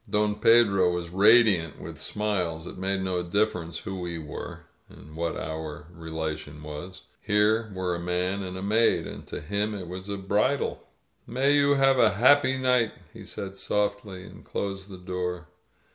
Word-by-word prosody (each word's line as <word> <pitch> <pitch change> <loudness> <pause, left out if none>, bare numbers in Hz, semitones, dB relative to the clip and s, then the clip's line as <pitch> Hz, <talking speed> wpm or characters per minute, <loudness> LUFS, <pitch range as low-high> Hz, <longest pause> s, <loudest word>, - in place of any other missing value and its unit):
Don 105 0 +2
Pedro 100 -6 +5
was 85 -1 -4
radiant 100 -4 +5
with - - -8
smiles. 90 -6 -2
It - - -8
made 95 +1 -1
no 90 -1 -1
dif 100 +5 +1
ference 85 -2 -6
who 95 0 -5
we 85 -1 -4
were, 75 -3 -7 0.3
or - - -15 0.2
what 85 +1 -2
our 80 -1 -5
relation 80 -2 -5
was. 75 +5 -8 0.2
Here 110 +1 +2
were 90 -1 -1
a 85 - -3
man 90 +3 -1
and 95 -1 -5
a 95 - -5
maid, 110 +3 +3
and - - -9
to - - -5
him 105 +6 -1
it 95 -3 -6
was 95 +3 -7
a 100 - -2
bridal. 105 +8 0 0.5
"May 135 +4 +2
you 145 0 +4
have 135 -1 +4
a 110 -5 +4
happy 130 +3 +5
night," 125 -3 +2 0.2
he - - -10
said 95 0 -6
softly, 100 -1 -2
and - - -13
closed 95 0 -4
the 95 - -9
door. 90 -1 -4
95 Hz, 175 wpm, -27 LUFS, 90-105 Hz, 0.5 s, Pedro